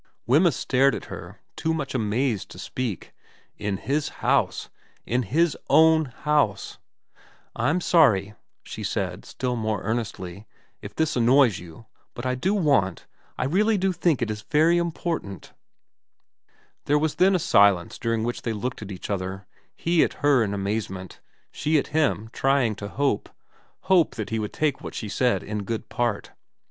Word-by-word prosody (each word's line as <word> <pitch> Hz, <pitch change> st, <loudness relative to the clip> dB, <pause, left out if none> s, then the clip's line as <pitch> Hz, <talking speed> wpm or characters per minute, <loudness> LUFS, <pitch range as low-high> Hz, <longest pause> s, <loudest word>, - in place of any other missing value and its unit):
Wemyss 150 Hz, +5 st, +4 dB
stared 135 Hz, +2 st, +2 dB
at -, -, -7 dB
her, -, -, -10 dB
too 160 Hz, 0 st, -1 dB
much 140 Hz, -4 st, -4 dB
amazed 115 Hz, -1 st, -1 dB
to -, -, -12 dB
speak. 120 Hz, -8 st, -5 dB, 0.5 s
In 100 Hz, -2 st, -2 dB
his 145 Hz, +8 st, -1 dB, 0.2 s
house... -, -, +1 dB, 0.4 s
In 125 Hz, +2 st, 0 dB
his 155 Hz, -, +1 dB
own 160 Hz, 0 st, +5 dB
house! 140 Hz, -6 st, -1 dB, 0.8 s
'I'm 145 Hz, +10 st, +1 dB
sorry, 110 Hz, -, +4 dB, 0.3 s
'she -, -, -7 dB
said, -, -, -3 dB
still 125 Hz, -1 st, -3 dB
more 110 Hz, -3 st, -2 dB
earnestly, 105 Hz, -3 st, -4 dB, 0.3 s
'if -, -, -9 dB
this 160 Hz, -1 st, 0 dB
annoys 125 Hz, -2 st, +4 dB
you, 85 Hz, +5 st, -12 dB, 0.3 s
but 120 Hz, -, -6 dB
I 130 Hz, -, +1 dB
do 185 Hz, +11 st, 0 dB
want 140 Hz, -, +1 dB, 0.3 s
I -, -, -1 dB
really 210 Hz, +9 st, +2 dB
do 190 Hz, 0 st, +1 dB
think 160 Hz, -6 st, +1 dB
it 110 Hz, -, -2 dB
is 105 Hz, 0 st, -5 dB
very 160 Hz, +9 st, +3 dB
important/ 165 Hz, -, -4 dB, 1.3 s
There 145 Hz, -, +3 dB
was 155 Hz, 0 st, 0 dB
then 190 Hz, +1 st, +6 dB
a -, -, +4 dB
silence 100 Hz, -, +3 dB
during 115 Hz, -2 st, -1 dB
which 120 Hz, +1 st, -3 dB
they 115 Hz, -, -2 dB
looked 125 Hz, +4 st, -4 dB
at 105 Hz, -, -7 dB
each 95 Hz, +2 st, -6 dB
other, 95 Hz, 0 st, -4 dB, 0.3 s
he 170 Hz, -1 st, +2 dB
at -, -, -1 dB
her 140 Hz, -5 st, +5 dB
in 100 Hz, -1 st, -2 dB
amazement, 100 Hz, -2 st, -4 dB, 0.3 s
she 155 Hz, +1 st, +1 dB
at 140 Hz, -, -1 dB
him 140 Hz, -8 st, +1 dB
trying 135 Hz, -4 st, +2 dB
to 100 Hz, -, -6 dB
hope, 135 Hz, 0 st, -1 dB, 0.5 s
hope 185 Hz, -4 st, +3 dB
that 110 Hz, -1 st, -5 dB
he 110 Hz, -, 0 dB
would 105 Hz, -1 st, -3 dB
take 150 Hz, -3 st, -1 dB
what -, -, -8 dB
she -, -, -4 dB
had 105 Hz, -, -6 dB
said 125 Hz, -1 st, +1 dB
in 105 Hz, 0 st, -4 dB
good 110 Hz, +3 st, -5 dB
part. 120 Hz, -4 st, -2 dB
125 Hz, 165 wpm, -25 LUFS, 105-155 Hz, 1.3 s, then